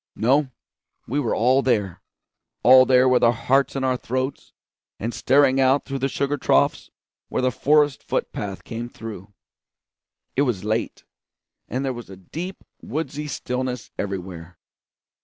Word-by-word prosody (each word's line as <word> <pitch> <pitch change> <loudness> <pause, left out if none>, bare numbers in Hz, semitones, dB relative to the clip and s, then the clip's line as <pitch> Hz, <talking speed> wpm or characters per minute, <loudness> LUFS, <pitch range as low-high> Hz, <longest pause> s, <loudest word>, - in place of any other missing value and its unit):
No, 135 +5 +2 0.6
we 140 +5 -1
were 125 -6 0
all 130 +4 +3
there; 105 -9 0 0.6
all 130 +1 +8
there 130 0 +5
with 125 -1 +3
our 120 - +6
hearts 130 +5 +1
in 135 - -2
our 130 -1 +1
throats, 130 +3 -4 0.5
and 115 +3 -4
staring 135 0 +3
out 135 +1 +3
toward 135 -1 -4
the 135 - +2
sugar 140 +2 -1
troughs - - +1 0.4
where - - -1
the 130 - +2
forest 145 +2 +2
foot - - -3
path 100 -2 -5
came 115 +1 -6
through. 105 -4 -9 1.0
It 135 - +2
was 120 -9 0
late, 110 +2 -2 0.6
and 130 +4 -3
there 130 - -1
was 120 -4 -9
a 95 - -10
deep 170 - -7 0.2
woodsy 150 -1 -4
stillness 125 -3 -4
everywhere. 90 -3 -5
130 Hz, 150 wpm, -23 LUFS, 115-135 Hz, 1.0 s, all